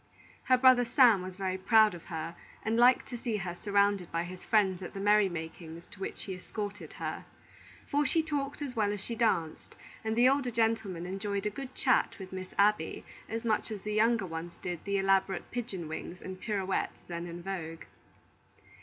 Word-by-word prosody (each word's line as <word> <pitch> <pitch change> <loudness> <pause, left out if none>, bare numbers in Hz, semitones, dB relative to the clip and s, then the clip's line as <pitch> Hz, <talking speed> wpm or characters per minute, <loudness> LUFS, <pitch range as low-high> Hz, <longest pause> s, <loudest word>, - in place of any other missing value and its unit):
Her 255 - +5
brother 255 -1 +6
Sam 235 -4 +5
was 185 0 -7
very 190 -1 -2
proud 215 +1 +5
of 175 - -10
her, 165 -1 -5 0.3
and 220 +1 0
liked 245 +2 +5
to 245 - -4
see 230 -3 -1
her 175 -3 -4
surrounded 200 -1 +1
by 165 0 0
his 180 +1 -8
friends 195 -4 +2
at 180 - -7
the - - -4
merry 205 0 +4
makings 165 0 -7
to - - -11
which 195 - -5
he 195 - -5
escorted 205 +2 -6
her; - - -5 0.6
for 290 +1 +2
she 320 +3 +2
talked 290 -1 -3
as 265 -3 -5
well 210 -2 +2
as 205 - -4
she 230 - -5
danced, 215 -9 0 0.3
and 220 0 -1
the 240 +2 +6
older 270 -1 +2
gentlemen 220 -6 0
enjoyed 200 +2 -3
a 210 - 0
good 260 +4 -8
chat - - +2
with 190 -1 -9
Miss 185 0 -6
Abby 200 -5 +2 0.2
as 225 +1 -4
much 220 -2 +1
as 210 -3 -5
the 210 +1 -3
younger 225 -1 +3
ones 165 0 -6
did 175 -2 -5
the 200 0 0
elaborate 195 0 +1
pigeon 205 -9 -4
wings 170 +3 -6
and 185 0 -8
pirouettes 195 -3 -2
then 170 0 -5
in 170 0 -7
vogue. 165 -4 -5
200 Hz, 195 wpm, -31 LUFS, 180-225 Hz, 0.6 s, brother